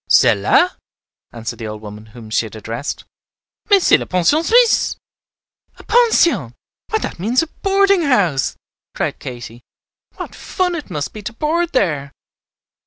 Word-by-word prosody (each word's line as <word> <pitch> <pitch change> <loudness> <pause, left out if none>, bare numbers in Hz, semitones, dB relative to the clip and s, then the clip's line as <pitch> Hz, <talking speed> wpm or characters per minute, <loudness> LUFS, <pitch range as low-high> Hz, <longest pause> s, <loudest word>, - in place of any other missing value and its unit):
"Celle - - +5
là?" 360 - +3 0.6
answered 115 0 -6
the 115 - -5
old 105 0 -8
woman 105 +1 -10
whom 110 0 -13
she 110 - +1
had 110 - -13
addressed. 115 +5 -5 0.7
"Mais 400 -3 +5
c'est - - +6
la - - -6
Pension 185 - +2
Suisse." 470 +5 +3 0.8
"A - - -14
pension; 470 -8 +3 0.3
why, 440 - +1
that 425 - -5
means 235 - +1
a - - -6
boarding 395 -1 +3
house," 200 - +1 0.4
cried - - -2
Katy. 120 -1 -9 0.5
"What - - -7
fun 365 -2 -2
it 315 -8 -6
must 150 -5 -4
be 215 - -8
to 215 +3 -6
board 330 +6 -1
there!" 145 - 0
200 Hz, 155 wpm, -18 LUFS, -, 0.8 s, c'est